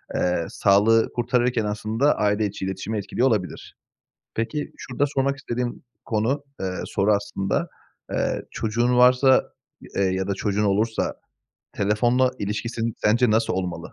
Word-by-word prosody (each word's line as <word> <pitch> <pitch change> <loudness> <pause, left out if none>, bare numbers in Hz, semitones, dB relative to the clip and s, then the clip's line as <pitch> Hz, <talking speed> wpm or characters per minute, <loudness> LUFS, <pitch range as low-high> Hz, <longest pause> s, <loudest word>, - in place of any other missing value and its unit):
eee, 90 -2 +1
sağlığı 105 +3 +3
kurtarırken 120 -1 +1
aslında 110 +7 +1
aile 105 +1 +1
içi 95 -1 -4
iletişimi 100 +3 -3
etkiliyor 115 +5 0
olabilir. 105 -7 -2 0.6
Peki, 145 +7 -2
şurada 130 +3 -1
sormak 140 0 0
istediğim 125 -2 -4 0.2
konu, 120 +6 0 0.2
eee, 95 -1 -2
soru 105 +2 +1
aslında, 100 -1 -1 0.4
eee, - - -1
çocuğun 120 +3 0
varsa, 125 +1 +5 0.5
eee, 100 - +2
ya 95 0 0
da 100 - 0
çocuğun 105 +2 -1
olursa 110 +3 0 0.6
telefonla 120 +5 +2
ilişkisi 110 +3 -3 0.2
sence 115 +3 +3
nasıl 110 +1 +2
olmalı? 90 -1 -4
110 Hz, 130 wpm, -24 LUFS, 100-125 Hz, 0.6 s, varsa